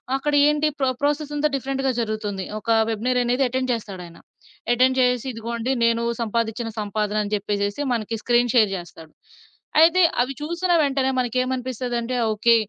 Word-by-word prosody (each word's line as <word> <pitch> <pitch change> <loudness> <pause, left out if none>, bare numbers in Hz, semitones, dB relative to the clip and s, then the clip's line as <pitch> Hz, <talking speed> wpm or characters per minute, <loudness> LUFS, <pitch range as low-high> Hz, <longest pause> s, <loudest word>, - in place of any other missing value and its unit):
అక్కడ 295 +2 -1
ఏంటి 300 +1 +2
ప్రా 265 -1 +2
ప్రాసెస్ 295 +1 0
అంతా 295 +1 +2
డిఫరెంట్‌గా 270 0 -1
జరుగుతుంది. 215 -4 -3
ఒక 230 - -9 0.2
వెబినెయిర్ 245 +3 0
అనేది 245 +3 +1
ఎటెండ్ 255 +1 -1
చేస్తాడాయన. 185 -7 -7 0.6
ఎటెండ్ 260 +2 +3
జేసేసి 250 0 +2
"ఇదిగోండి 235 +2 -3
నేను 230 0 +2 0.2
సంపాదిచ్చిన 230 0 -2
సంపాదన" 210 0 -1
అని 205 +1 -5
జెప్పేసేసి 205 +3 -2
మనకి 225 -1 -2
స్క్రీన్ 240 0 +2
షేర్ 215 -4 +5
జేస్తాడు. 165 -3 -10 0.7
అయితే 340 +3 +6 0.2
అవి 255 +2 -1
చూసిన 340 +4 -2
వెంటనే 270 -2 +1
మనకేమనిపిస్తదంటే 255 -1 -2 0.2
ఓకే. 230 +2 +4
240 Hz, 140 wpm, -23 LUFS, 215-265 Hz, 0.7 s, అయితే